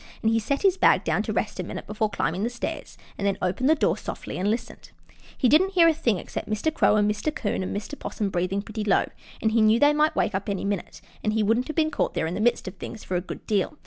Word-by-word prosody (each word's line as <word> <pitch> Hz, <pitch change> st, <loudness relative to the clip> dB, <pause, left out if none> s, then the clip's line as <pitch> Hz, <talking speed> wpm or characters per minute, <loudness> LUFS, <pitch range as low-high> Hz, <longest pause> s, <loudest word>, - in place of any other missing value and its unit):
He 225 Hz, +1 st, +3 dB
set 280 Hz, -, -2 dB
his 385 Hz, -1 st, +4 dB
bag -, -, +4 dB
down -, -, +1 dB
to -, -, -3 dB
rest -, -, -2 dB
a -, -, -1 dB
minute -, -, -6 dB
before 215 Hz, 0 st, -1 dB
climbing 185 Hz, -2 st, -1 dB
the 230 Hz, -, 0 dB
stairs, 240 Hz, 0 st, -6 dB, 0.2 s
and 200 Hz, -, 0 dB
then 200 Hz, -, 0 dB
opened 190 Hz, +9 st, 0 dB
the 315 Hz, -, +6 dB
doors 310 Hz, -, +1 dB
softly -, -, -6 dB
and 195 Hz, +3 st, +1 dB
listened. 235 Hz, +2 st, -4 dB, 0.5 s
He 255 Hz, -, +3 dB
didn't 370 Hz, +9 st, +4 dB
hear 340 Hz, -3 st, +6 dB
a 330 Hz, -, +5 dB
thing 250 Hz, -, 0 dB
except -, -, -6 dB
Mr. 215 Hz, +9 st, 0 dB
Crow 215 Hz, -, +3 dB
and 210 Hz, -1 st, +3 dB
Mr. 210 Hz, +8 st, -1 dB
'Coon 215 Hz, -10 st, -2 dB
and 185 Hz, -, -3 dB
Mr. 210 Hz, +7 st, -7 dB
'Possum 205 Hz, -3 st, -3 dB
breathing 185 Hz, +3 st, -1 dB
pretty 215 Hz, 0 st, -5 dB
low, 205 Hz, -2 st, +3 dB, 0.4 s
and 220 Hz, -, +3 dB
he 225 Hz, 0 st, +3 dB
knew 215 Hz, +2 st, +5 dB
they 290 Hz, +2 st, +5 dB
might 300 Hz, +1 st, +2 dB
wake 215 Hz, -, +1 dB
up 190 Hz, +2 st, -3 dB
any 200 Hz, -1 st, -2 dB
minute, 200 Hz, -3 st, -4 dB, 0.2 s
and 215 Hz, -, +1 dB
he 220 Hz, 0 st, +2 dB
wouldn't 230 Hz, +4 st, +1 dB
have 310 Hz, -, -5 dB
been 315 Hz, -1 st, +2 dB
caught -, -, -1 dB
there -, -, 0 dB
in 165 Hz, -, -3 dB
the 210 Hz, -, -3 dB
midst 240 Hz, -2 st, +1 dB
of 185 Hz, -, -5 dB
things 220 Hz, -, -8 dB
for 185 Hz, -, -3 dB
a 175 Hz, -, +1 dB
good 185 Hz, -, -8 dB
deal. 210 Hz, +6 st, 0 dB
215 Hz, 275 wpm, -25 LUFS, 200-280 Hz, 0.5 s, the